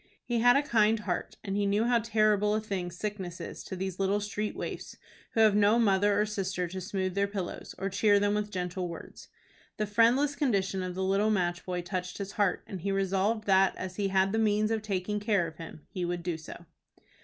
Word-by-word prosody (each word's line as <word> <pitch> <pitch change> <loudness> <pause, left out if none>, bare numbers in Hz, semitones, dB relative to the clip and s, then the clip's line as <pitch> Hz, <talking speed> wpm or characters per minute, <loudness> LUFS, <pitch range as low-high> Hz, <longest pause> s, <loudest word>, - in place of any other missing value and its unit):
He 240 -1 -1
had 245 +1 +6
a 285 - +2
kind 220 -5 +3
heart, 180 -4 -3
and 195 -2 -3
he 205 0 +1
knew 205 +2 +2
how 240 -1 +3
terrible 215 -2 +2
a - - +1
thing 195 -5 -3
sickness 185 -1 -5
is - - -7
to - - -5
these 190 0 -4
little 195 +1 +2
street 210 +1 -3
waifs, - - -6 0.4
who 225 - +3
have 215 -2 +6
no 210 +2 +5
mother 205 -2 +3
or 210 - +3
sister 190 -4 -2
to 185 +1 -5
smooth 185 0 -2
their 200 +1 +1
pillows, 195 -3 -5
or 195 +1 -2
cheer 205 +1 +3
them 205 0 +1
with 210 0 -1
gentle 180 -1 -3
words. 170 -1 -10 0.5
The 215 - 0
friendless 235 +7 +3
condition 195 -9 0
of 180 -1 -4
the 190 - -2
little 195 +3 +2
match 175 -4 0
boy 180 -1 -3
touched 180 0 -4
his 200 -1 -5
heart, 200 -4 0
and 190 -3 -7
he 200 +3 -1
resolved 195 +3 0
that, 190 -1 +4
as 185 -1 -6
he 200 -1 +1
had 190 0 +2
the 220 - 0
means 215 0 +2
of 220 -1 0
taking 210 0 -2
care 205 -4 +1
of 160 -1 -8
him, 165 -2 -10
he 180 - -3
would 175 0 -2
do 175 -1 -1
so. 160 +2 -10
200 Hz, 225 wpm, -29 LUFS, 185-210 Hz, 0.5 s, had